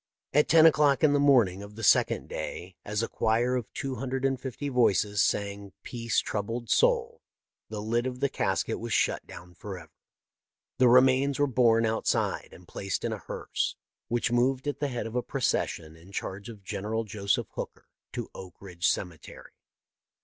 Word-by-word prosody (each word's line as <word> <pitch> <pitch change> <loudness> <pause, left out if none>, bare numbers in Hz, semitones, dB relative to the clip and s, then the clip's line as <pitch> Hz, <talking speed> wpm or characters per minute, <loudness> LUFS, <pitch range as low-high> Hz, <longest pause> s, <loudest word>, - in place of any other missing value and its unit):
At 150 +1 +4
ten 160 0 +7
o'clock 150 -2 +4
in 150 -2 +5
the 145 - +3
morning 120 -10 +4
of 100 +1 -10
the 115 - -8
second - - +3
day, 90 +1 -6
as 105 +2 -2
a - - -1
choir 120 +3 +1
of 120 -4 -4
two 135 -1 -4
hundred 130 +2 -2
and 135 -2 0
fifty 135 +2 -5
voices 105 -6 +2
sang 100 -1 -1
" - - -61
Peace, 115 -2 -3
Troubled 115 +3 -4
Soul," 475 -1 +2 0.5
the 105 -1 -5
lid 120 +3 0
of 125 -1 -5
the 140 - +2
casket - - -1
was - - -4
shut - - +1
down 90 +1 -11
forever. 90 -3 -9 0.9
The 130 - +6
remains 130 +2 +5
were 145 - +3
borne 115 -3 +3
outside 110 0 0
and 90 - -15
placed 95 -2 -3
in - - -1
a - - -5
hearse, - - -3 0.3
which 120 0 0
moved 130 +3 +1
at 145 - -2
the 145 - 0
head 125 -3 -4
of 115 +1 -6
a 125 - +2
procession 85 - -2
in 85 +4 -16
charge 100 +2 -5
of 105 -4 -11
General 105 +3 -3
Joseph 100 -2 -1
Hooker - - -7 0.3
to - - -4
Oak 90 -2 -10
Ridge 90 -2 -2
cemetery. 90 -4 -4
115 Hz, 180 wpm, -28 LUFS, 100-130 Hz, 0.9 s, ten